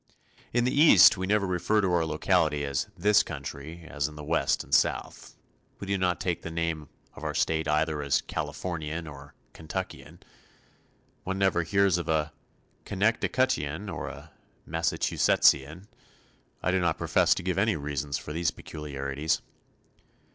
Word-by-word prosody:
In 120 0 +2
the 125 - +1
East 145 - +8
we 95 -1 -3
never 105 0 +2
refer 95 +4 +1
to 95 -3 +1
our 85 -2 +2
locality 75 -2 +1
as 70 +4 -2
"this 105 +4 +4
country," 80 +5 -7
as 75 -1 -2
in 75 - -11
the 75 - -8
West 75 -2 +1
and - - -11
South. - - 0 0.4
We - - -6
do 100 0 0
not 90 -2 0
take 85 -2 -2
the - - -6
name 80 -2 -3 0.2
of - - -12
our - - -3
state 80 -1 0
either 75 0 +1
as 70 -1 +1
"Californian" 80 -2 -4
or 70 -1 -11 0.2
"Kentuckian." 80 -1 -7 1.0
One 95 +1 -3
never 95 -3 +2
hears 95 +1 +2
of 85 - -5
a 75 -1 0 0.5
"Connecticutian" 105 - 0
or 85 - -5
a - - -10 0.4
"Massachusettisian." 80 0 +2 0.8
I 90 - +2
do 95 - +2
not 85 -3 0
profess - - +3
to - - -5
give - - -1
any - - +2
reasons 70 -1 -3
for 75 -2 -7
these 85 +1 +1
peculiarities. 70 0 -3
80 Hz, 155 wpm, -27 LUFS, 75-95 Hz, 1.0 s, East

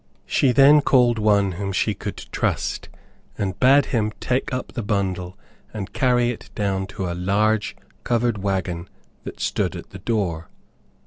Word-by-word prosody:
She 135 - +2
then 140 +4 +7
called 120 -4 +3
one 100 -2 +3
whom 100 +2 -4
she - - 0
could - - -6
trust, - - -2 0.5
and 95 -2 -3
bade 135 +2 +5
him 110 -3 +1
take 130 +1 -1
up 130 -1 -4
the 120 - -4
bundle 95 -4 -2 0.4
and 100 -2 -5
carry 120 -2 +2
it 120 - -10
down 95 -2 -1
to 95 - -5
a 85 - -2
large 105 +4 +1 0.3
covered 120 -2 0
wagon 95 -3 -2 0.4
that - - -8
stood - - -1
at - - -9
the 95 - -9
door. 90 - -2
105 Hz, 155 wpm, -22 LUFS, 95-120 Hz, 0.5 s, then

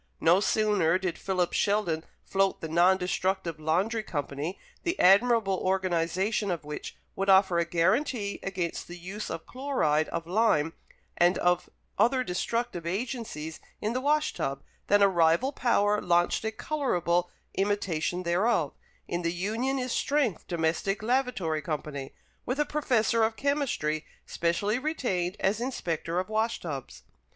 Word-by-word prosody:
No 170 +3 +5
sooner 205 -5 +2
did 185 -3 -3
Philip 185 -2 0
Sheldon 200 -6 +1 0.2
float 195 0 +1
the 160 - -5
Non 175 +4 +4
destructive 180 -2 -1
Laundry 185 +9 +1
Company, 150 -1 -4 0.2
the 345 +2 -2
admirable 200 0 +5
organization 185 +2 0
of 170 -4 -2
which 150 0 -6 0.2
would 195 +1 -1
offer 190 -2 +5
a 170 - +2
guarantee 200 - 0
against 180 -3 -3
the 175 - -8
use 190 +5 -6
of 165 - -5
chloride 250 - 0
of 165 -1 -3
lime 175 -5 +2 0.4
and 175 +1 +4 0.6
other 255 +2 +4
destructive 180 -2 -2
agencies 195 - -4 0.2
in 215 +2 -1
the 255 - -1
wash 300 +2 +2
tub, 135 0 -3 0.2
than 205 0 +5
a - - +7
rival 170 +7 +3
power 210 -6 +2
launched 175 +3 +2
a 220 - 0
colourable 180 - 0 0.2
imitation 185 -3 -1
thereof, 175 - +1 0.3
in 175 - -2
the 170 -1 0
Union 220 +10 -1
is 255 -1 -2
Strength 275 - 0
Domestic 175 +5 -1
Lavatory 225 -11 0
Company, 145 -3 -5 0.3
with 255 +4 -3
a 295 - +3
professor 245 -7 +1
of 220 0 +2
chemistry 265 - -1 0.2
specially 200 +7 0
retained 210 - -1
as 200 +4 +1
inspector 170 - -2
of 185 - -2
wash 220 +2 0
tubs. 140 -6 -7
190 Hz, 140 wpm, -28 LUFS, 170-225 Hz, 0.6 s, a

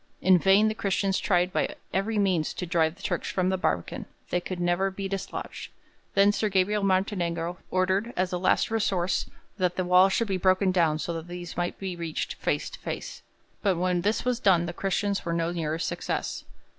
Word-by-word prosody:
In 185 -1 +5
vain 195 +4 +5
the 215 - +1
Christians 195 -2 0
tried 180 -1 +1
by - - 0 0.2
every 210 +3 0
means 185 -6 +1
to 180 - -3
drive 165 -1 +1
the - - -17
Turks - - -2
from 185 -1 0
the 190 - +1
barbican; 90 - -2 0.2
they 180 - +1
could 180 0 -5
never 175 +2 +1
be 195 0 -5
dislodged. 195 0 -5 0.5
Then 200 +1 +6
Sir 210 +1 0
Gabriel 200 +2 +2
Martinengo 180 -3 0
ordered, 190 +5 +1
as 185 0 0
a 180 - -1
last 185 - +2
resource, 195 -5 0 0.3
that 180 -1 +1
the 185 - -1
wall 180 +2 +6
should 230 +4 0
be 190 -2 0
broken 185 +1 +3
down 165 -4 +2
so 170 +2 -3
that 165 0 -6
these 175 -1 -7
might 175 0 -2
be 190 -2 -4
reached 170 -2 -3
face - - -1
to - - -10
face, - - -6 0.4
but 195 -4 +2
when 180 0 +1
this 210 +6 0
was 250 -2 +1
done 180 -6 +4
the 170 - -4
Christians 195 +2 -1
were 170 - -2
no 170 0 0
nearer 160 -2 -2
success. - - -3
185 Hz, 200 wpm, -27 LUFS, 175-195 Hz, 0.5 s, Then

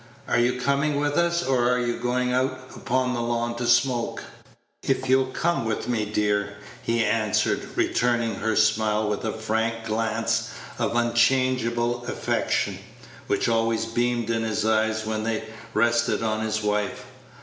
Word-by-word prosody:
"Are - - +2
you 125 +1 +1
coming 140 +2 +1
with 145 0 0
us, 170 0 +2
or 125 -4 +2
are 125 - +2
you 120 -1 -1
going 125 +1 0
out 130 0 -1
upon 125 0 0
the 120 - -2
lawn 120 0 -1
to 120 0 -2
smoke?" 120 0 +2 0.6
"If 130 -1 -1
you'll 130 0 +3
come 170 +3 -1
with 110 -1 -2
me, 115 -3 0
dear," 105 -1 0 0.3
he 115 -1 +1
answered, 110 -3 0
returning 120 -2 +1
her 110 +2 -1
smile 110 -1 +2
with 105 -1 -2
a 110 - 0
frank 115 +1 -2
glance 115 +1 0 0.3
of 115 -1 0
unchangeable 120 0 +2
affection, - - -1 0.5
which - - +1
always 115 -1 +1
beamed 120 0 0
in 115 0 0
his 110 -1 -1
eyes 110 0 +1
when 110 0 -2
they 110 0 -1 0.3
rested 115 +1 +2
on 110 -1 0
his 110 0 -1
wife. 105 +5 -1
115 Hz, 155 wpm, -25 LUFS, 110-125 Hz, 0.6 s, you'll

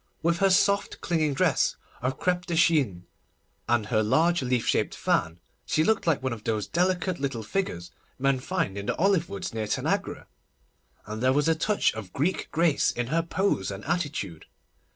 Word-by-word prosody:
With 170 +1 +2
her 195 - +4
soft, 200 +2 +2
clinging 155 -4 0
dress - - +2 0.3
of 130 +2 -1
crêpe 180 0 0
de 170 - -1
chine, 140 - +2 0.6
and 120 -3 +2
her 110 0 +1
large 165 +11 +2
leaf 125 -2 0
shaped - - +1
fan, 80 +2 0 0.2
she 155 - +1
looked 220 -1 +1
like 150 -5 +2
one 130 -2 -1
of 110 -2 -9
those 110 -3 -1
delicate 180 - 0
little 135 -5 -3
figures 105 - -3 0.3
men 135 0 +1
find 100 -5 -2
in 100 - -7
the - - 0
olive 190 -2 +2
woods 195 - -5
near 110 -1 -3
Tanagra; - - -2 0.8
and 110 +1 -6
there 130 +1 +3
was 145 +3 +2
a 165 - +5
touch 205 +6 +1
of 105 -4 -8
Greek 165 +7 -1
grace 165 -3 +2
in 120 -1 -3
her 165 - +3
pose 170 - 0
and 100 +1 -7
attitude. 145 - -3
145 Hz, 180 wpm, -27 LUFS, 110-175 Hz, 0.8 s, a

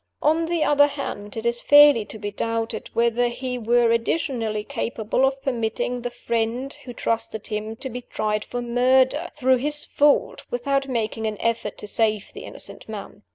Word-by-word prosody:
On 320 +2 +3
the 335 -2 +1
other 290 0 +5
hand, 225 -8 -6
it 225 - -4
is 235 0 +1
fairly 290 -6 +7
to 220 - -8
be 205 -1 -5
doubted 230 +2 -2
whether 235 +1 +2
he 250 +1 -4
were 235 +1 +3
additionally 230 -3 0
capable 235 0 -1
of 270 0 -2
permitting 245 -1 -1
the 245 - -3
friend 235 +3 -2
who 250 - -10
trusted 225 -2 -2
him 215 +1 -4
to 265 - -6
be 250 0 -6
tried 215 -2 -2
for 245 0 -5
murder, 260 +6 +3
through 260 -3 +3
his 295 +3 -2
fault, 290 0 +2
without 275 +3 0
making 225 -3 -2
an 215 -1 -3
effort 230 -2 -1
to - - -7
save 215 -1 0
the - - -9
innocent - - -5
man. 205 -1 -8
240 Hz, 175 wpm, -23 LUFS, 220-270 Hz, -, fairly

